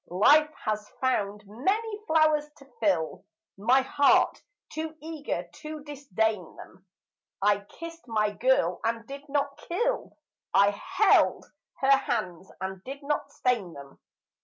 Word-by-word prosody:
Life 295 - +5 0.2
has 210 -1 -2
found 210 -5 0
many 405 - -1
flowers 310 -2 +3
to 275 - -16
fill 185 -8 0 0.3
My 240 +7 +4
heart, 285 +1 +3 0.3
too 315 0 -5
eager 295 - -4
to 305 -1 -7
disdain 220 - -2
them; 190 +1 -14 0.5
I 205 0 +3
kissed 335 +4 -10
my 215 -2 +1
girl 205 -6 +2
and 230 0 -1
did 280 +3 -9
not 280 0 -1
kill, 480 +8 -2 0.4
I 200 +1 +6
held 380 - +3 0.4
her 270 0 +4
hands 190 -9 -3
and 190 0 -5
did 275 +2 -8
not 295 +1 -1
stain 225 -9 0
them. 140 -1 -12
260 Hz, 130 wpm, -27 LUFS, 205-300 Hz, 0.5 s, I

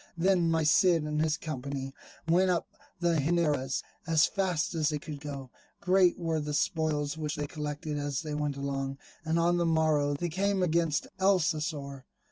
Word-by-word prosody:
Then 175 -1 +3
my 165 -1 +2
Cid 165 +2 +4
and 150 0 -1
his 160 0 +1
company 135 -3 -5 0.3
went 180 +3 +4
up 175 -2 +1 0.3
the 170 -2 +2
Henares 145 -4 +1 0.2
as 160 -1 +5
fast 185 -7 -1
as 160 -2 +1
they 150 - -1
could 150 -1 -7
go; 140 -3 -7 0.3
great 185 -1 +3
were 165 -2 -1
the 150 -1 -3
spoils 155 -2 0
which 150 -1 -2
they 150 - -3
collected 150 0 -4
as 145 0 -2
they 155 -1 -4
went 150 -2 -2
along. 135 -1 -3 0.3
And 160 +1 0
on 170 +1 +3
the 170 - +1
morrow 155 -3 +2
they 175 +4 -2
came 195 +3 0
against 165 -3 +1
Alcocer. 150 -7 0
155 Hz, 170 wpm, -29 LUFS, 145-170 Hz, 0.3 s, as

